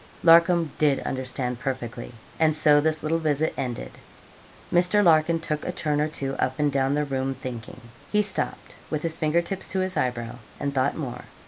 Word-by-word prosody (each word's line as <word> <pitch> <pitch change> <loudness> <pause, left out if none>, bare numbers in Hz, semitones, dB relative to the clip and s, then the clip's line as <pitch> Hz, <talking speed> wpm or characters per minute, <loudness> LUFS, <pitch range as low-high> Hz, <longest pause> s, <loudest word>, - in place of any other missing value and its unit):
Larcom 170 -1 +5
did 145 -3 +3
understand 125 -1 -3
perfectly, 125 -3 -5 0.3
and 155 -1 +3
so 150 -1 +5
this 155 0 -1
little 160 +2 0
visit 155 -1 0
ended. 120 - -5 0.7
Mr. 180 +4 +4
Larkin 165 -1 +4
took 155 -2 -3
a - - -2
turn 150 -4 -1
or 150 - +1
two 140 -3 -3
up 130 0 -1
and 150 -1 +1
down 135 0 +1
the 150 0 0
room 135 -1 -2
thinking. 125 -3 -8 0.3
He 210 0 +3
stopped, 195 -2 0
with 155 -1 -2
his 165 -1 -2
fingertips 170 +5 0
to 190 - -2
his 185 0 -2
eyebrow, 120 -2 -2 0.2
and 140 -1 -2
thought 135 +1 +1
more. 135 -6 -6
150 Hz, 180 wpm, -25 LUFS, 130-165 Hz, 0.7 s, Larcom